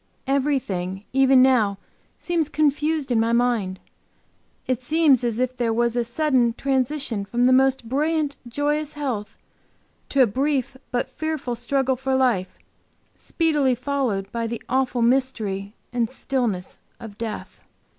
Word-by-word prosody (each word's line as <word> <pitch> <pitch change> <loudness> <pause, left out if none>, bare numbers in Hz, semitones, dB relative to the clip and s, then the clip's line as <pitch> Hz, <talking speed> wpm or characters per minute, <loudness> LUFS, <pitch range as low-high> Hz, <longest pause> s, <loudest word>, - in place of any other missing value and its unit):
Everything, 245 -10 -1
even 265 -1 +6
now, 225 -7 +3 0.4
seems 335 -4 -1
confused 300 -1 0
in 235 - +3
my 225 +1 +2
mind. 235 -6 +1 0.9
It 255 -1 -1
seems 295 -2 +3
as 235 -2 -1
if 255 0 -1
there 235 -2 0
was 235 +1 +1
a 240 - +1
sudden 245 -1 +1
transition 265 -3 -1
from 240 +5 0
the 255 - +5
most 265 -2 +3
brilliant, 295 +3 0
joyous 295 +4 -1
health, 255 -8 -4 0.7
to 275 -2 +4
a - - +6
brief 270 +3 -1
but 245 -1 -1
fearful 310 -5 -3
struggle 260 +2 0
for 265 +1 -1
life, 240 -8 +1 0.6
speedily 295 -6 +1
followed 245 -7 -2
by 230 -1 -2
the 235 0 -5
awful 255 -1 +1
mystery 225 -5 0 0.2
and 235 -2 0
stillness 245 -8 -2 0.2
of 210 -3 -10
death. 225 -2 -6
255 Hz, 135 wpm, -23 LUFS, 230-275 Hz, 0.9 s, even